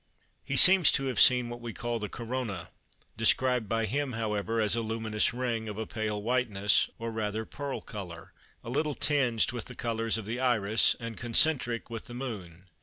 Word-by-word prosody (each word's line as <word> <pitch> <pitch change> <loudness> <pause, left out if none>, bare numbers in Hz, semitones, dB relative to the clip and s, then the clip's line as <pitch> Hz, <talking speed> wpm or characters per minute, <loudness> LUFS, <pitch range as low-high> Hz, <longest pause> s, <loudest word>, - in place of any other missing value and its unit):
He - - -3
seems 185 -4 +7
to 135 - 0
have 130 -4 -1
seen 125 -1 +5
what 120 0 -8
we 115 -1 -6
call 120 -1 -3
the 105 -1 -4
Corona, 115 -7 -5 0.5
described 125 0 +2
by 115 0 0
him 135 +4 -2
however 110 0 -2
as 105 0 +1
a 115 - -1
"luminous 110 -1 -1
ring," 120 -3 -3
"of 105 - -7
a 110 - -3
pale 110 -1 -3
whiteness, 110 -4 +2
or 115 0 -5
rather 110 0 -3
pearl 140 +2 -5
colour, 90 -6 -9 0.3
a - - -8
little 150 +2 -1
tinged 130 -6 +1
with 120 -2 -6
the - - -10
colours 115 -1 0
of 110 - -6
the 115 +4 -4
Iris, 110 -4 +3
and 115 -1 -7
concentric 120 -1 +2
with 115 -1 -6
the 120 - -9
Moon." 100 -9 -7
115 Hz, 185 wpm, -29 LUFS, 110-125 Hz, 0.5 s, seems